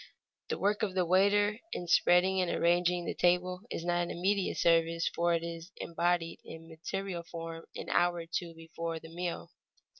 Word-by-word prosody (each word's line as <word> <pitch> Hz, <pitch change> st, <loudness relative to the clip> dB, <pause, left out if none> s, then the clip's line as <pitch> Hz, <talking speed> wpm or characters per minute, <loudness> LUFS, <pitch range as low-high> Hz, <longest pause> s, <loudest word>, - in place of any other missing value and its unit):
The -, -, -1 dB
work 205 Hz, +2 st, +1 dB
of 200 Hz, -4 st, -1 dB
the 185 Hz, -1 st, +2 dB
waiter 205 Hz, +4 st, +3 dB
in 175 Hz, -, -4 dB
spreading 180 Hz, +2 st, +4 dB
and 180 Hz, -, 0 dB
arranging 175 Hz, +1 st, +2 dB
the -, -, -2 dB
table 180 Hz, +1 st, +1 dB
is 165 Hz, -, -4 dB
not 175 Hz, 0 st, +1 dB
an 175 Hz, -, -2 dB
immediate 190 Hz, +2 st, 0 dB
service, 165 Hz, 0 st, +3 dB
for 170 Hz, 0 st, +2 dB
it 165 Hz, -, -2 dB
is 170 Hz, +2 st, -7 dB
embodied 170 Hz, 0 st, -1 dB
in 165 Hz, 0 st, -10 dB
material 170 Hz, +3 st, -4 dB
form 165 Hz, -1 st, -7 dB
an -, -, -6 dB
hour 175 Hz, 0 st, +3 dB
or 170 Hz, -1 st, -5 dB
two 170 Hz, 0 st, -4 dB
before 165 Hz, 0 st, -5 dB
the 160 Hz, 0 st, -12 dB
meal. 175 Hz, 0 st, -4 dB
175 Hz, 180 wpm, -31 LUFS, 165-180 Hz, -, spreading